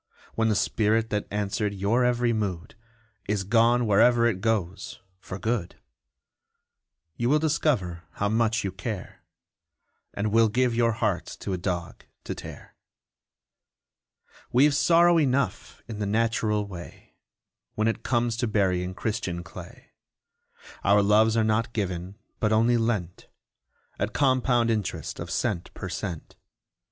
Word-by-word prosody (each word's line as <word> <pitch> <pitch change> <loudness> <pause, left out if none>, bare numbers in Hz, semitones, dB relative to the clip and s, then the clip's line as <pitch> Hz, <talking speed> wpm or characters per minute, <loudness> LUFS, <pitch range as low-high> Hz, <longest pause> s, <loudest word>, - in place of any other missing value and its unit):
When 110 0 +1
the 105 - +2
spirit 110 +2 +1
that 105 -1 -1
answered 105 0 -2
your 105 +6 +1
every 120 -1 +2
mood 95 -6 -3 0.5
Is 105 -1 0
gone 115 +4 +3
wherever 115 +3 +4
it 105 -6 0
goes 105 -5 -2 0.2
for 95 0 -7
good, 110 -4 -2 1.4
You 120 +1 0
will 150 - +5
discover 135 - 0
how 100 - -1
much 115 +1 +1
you 95 - -2
care, 95 +1 -6 0.9
And 105 +1 -1
will 115 0 +4
give 125 +2 +1
your 115 -1 +2
heart - - -1
to 95 - -3
a - - -1
dog 85 -2 -4 0.2
to - - -4
tear! - - -10 1.8
We've 140 +4 +5
sorrow 170 +3 +5
enough 140 -2 -1
in 110 -3 -7
the 105 - -1
natural 110 -1 +1
way, 90 -4 -11 0.6
When 110 +1 +1
it 115 - -1
comes 120 -1 0
to 120 0 0
burying 95 -3 0
Christian 95 -6 -3
clay. 95 +10 -12 0.9
Our 100 0 +4
loves 110 +2 +4
are 110 - +3
not 110 +2 0
given, 95 -2 -3 0.2
but 105 - +1
only 115 +2 +3
lent, 110 -7 -2 0.7
At 105 +3 -2
compound 125 -4 +2
interest 105 -4 -3
of - - -6
cent 85 - -2
per 95 - -6
cent. 90 -3 -6
110 Hz, 135 wpm, -26 LUFS, 100-120 Hz, 1.8 s, will